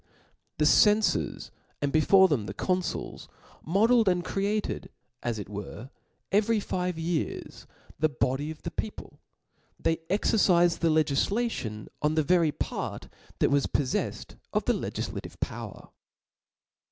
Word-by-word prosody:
The 150 - +2
cenfors, 210 +7 +3 0.3
and 145 -1 -1
before 190 +5 +6
them 130 - -1
the 95 - -6
confuls 185 - -2
J, - - -32 0.3
modelled 220 +5 +4
and 180 -1 0
created, 205 +2 -2 0.3
as 120 -2 -2
it 105 - -6
were, 105 +5 -7 0.4
every 215 +2 +3
five 180 -3 -2
years 165 -1 -3 0.3
the 155 - +3
body 145 +1 -1
of 160 -1 -9
the 170 - -4
people; 215 +6 -6 0.6
they 165 - +1
exercifed 180 -3 +3
the 165 - +2
legtfla 160 - +2
tion 105 - -5
on 150 +1 +1
the 155 - +3
very 170 0 +3
part - - -4 0.3
that - - +2
was 140 -1 +3
poffcfied 135 -3 -2
of - - 0
the - - +3
Ic - - -6
giflative - - -5
power. - - -6
165 Hz, 140 wpm, -28 LUFS, 145-195 Hz, 0.6 s, before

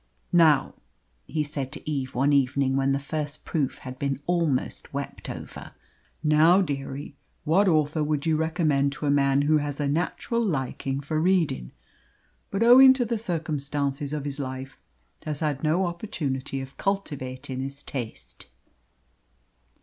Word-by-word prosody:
"Now," 160 -5 +5 0.5
he 155 -1 -1
said 140 -3 -4
to 150 - -9
Eve 135 -4 -3
one 140 +3 +3
evening, 135 0 +2
when 135 0 +2
the 135 - +2
first 150 +1 -5
proof 145 -6 -1
had 130 0 -9
been 140 -1 -1
almost 165 -6 0
wept - - -5
over, - - -8 0.5
"now, 155 +4 +5
dearie, 140 -2 -5 0.3
what 185 +6 +3
author 155 -2 +2
would 150 -1 -1
you 160 -1 +2
recommend 155 -4 +1
to 150 - -5
a 140 - +3
man 140 0 +3
who 155 +1 +4
has 145 -1 -4
a 145 - 0
natural 180 +9 -1
likin' 135 - -2
for 155 +2 -1
reading, 165 - +1 0.8
but 195 +3 0
owing 260 +3 +9
to 255 -2 0
the 230 -1 -1
circumstances 145 -6 -2
of 150 -2 -3
his 145 0 -4
life 130 0 -5 0.5
has 150 -1 -4
had 145 -3 -1
no 165 +5 +2
opportunity 145 -8 -3
of 135 +1 -10
cultivatin' 135 -9 -3
his 140 +1 -5
taste?" 110 - -7
145 Hz, 150 wpm, -26 LUFS, 135-160 Hz, 0.8 s, owing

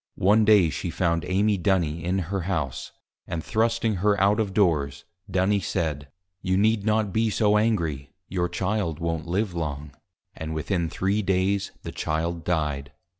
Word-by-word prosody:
One 105 +3 +4
Day 100 -7 +5
she - - -3
found 85 -3 0
Amy 100 +2 +1
Duny 85 -4 +1
in 90 +2 0 0.2
her 95 - 0
House, 80 -8 -3 0.4
and 80 -2 -4
thrusting 115 -1 +1
her 100 +2 +2
out 100 +3 +3
of 105 -3 0
Doors, 80 -9 +1 0.2
Duny 95 +2 +2
said, 80 -5 -2 0.3
You 95 0 +1
need 105 +1 +2
not 105 -3 +1
be 110 0 +2
so 105 0 +2
Angry, 85 -11 0 0.2
your 90 -1 -1
Child 95 -5 -1
won't 80 -1 -3
live 95 +2 -1
long. 75 -3 -4 0.4
And 80 0 -5
within 85 +1 -1
three 100 +5 0
Days 95 +1 0
the - - -5
Child 80 +2 -2
Died. 75 -5 -1
95 Hz, 160 wpm, -25 LUFS, 80-105 Hz, 0.4 s, Day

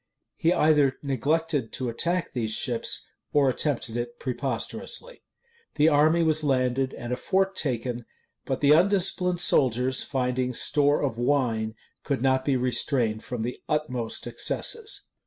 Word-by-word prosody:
He 170 -4 +1
either 150 -5 +3
neglected 145 0 -1
to 130 - -2
attack 170 +10 -1
these 115 -3 -2
ships 115 +1 -1 0.3
or 140 -3 +4
attempted 125 -4 -2
it 120 0 -4
preposterously. 140 - -4 0.5
The 155 +2 +4
army 155 +3 +4
was 155 -1 +2
landed, 130 -1 0
and 120 +1 -5
a - - +1
fort 190 +9 0
taken; 120 -4 -2 0.4
but 135 - -3
the 145 0 +5
undisciplined 180 +1 +3
soldiers, 130 -3 +3
finding 125 -1 -1
store 145 +3 +2
of 120 -5 -2
wine, 120 -4 0 0.3
could 135 -3 -2
not 130 -1 +2
be 135 -1 +1
restrained 125 -3 +1
from 120 -3 -4
the 120 +2 -5
utmost 130 -7 -2
excesses. 420 - -2
135 Hz, 140 wpm, -26 LUFS, 125-155 Hz, 0.5 s, the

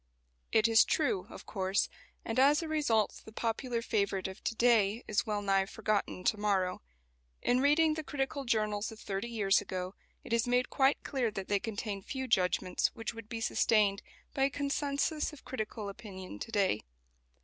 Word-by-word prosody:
It 220 0 +4
is 225 -1 +7
true, 245 - 0
of - - -10
course, 190 -1 0 0.4
and 225 +3 -1
as 290 +5 +5
a - - -4
result 285 -9 +1
the 220 - -12
popular 230 +2 -2
favourite 200 -4 0
of 190 +1 -9
to 230 - -1
day 225 -2 +3
is 215 +2 0
well 210 -1 -1
nigh 195 -1 +2
forgotten 210 -3 -1
to 215 - +2
morrow. 195 -3 +1 0.6
In 245 - +3
reading 305 +3 +4
the 315 0 -4
critical 280 0 -2
journals 215 -3 0
of 220 - -11
thirty 200 +4 -4
years 205 -4 +3
ago 185 -2 -4 0.3
it - - -5
is 235 +1 +2
made 245 +1 +1
quite 270 +1 +3
clear 260 -5 0
that 195 -3 -6
they 205 -1 +2
contain 205 -2 -4
few 265 +5 -4
judgments 185 -3 +2
which 225 0 -4
would 225 -1 -10
be 225 0 -4
sustained 210 -3 +3 0.3
by 270 - +2
a - - +2
consensus 285 +2 -1
of 295 - -14
critical 215 -3 -4
opinion 190 - -8
to - - -6
day. 195 - +2
220 Hz, 180 wpm, -32 LUFS, 200-255 Hz, 0.6 s, is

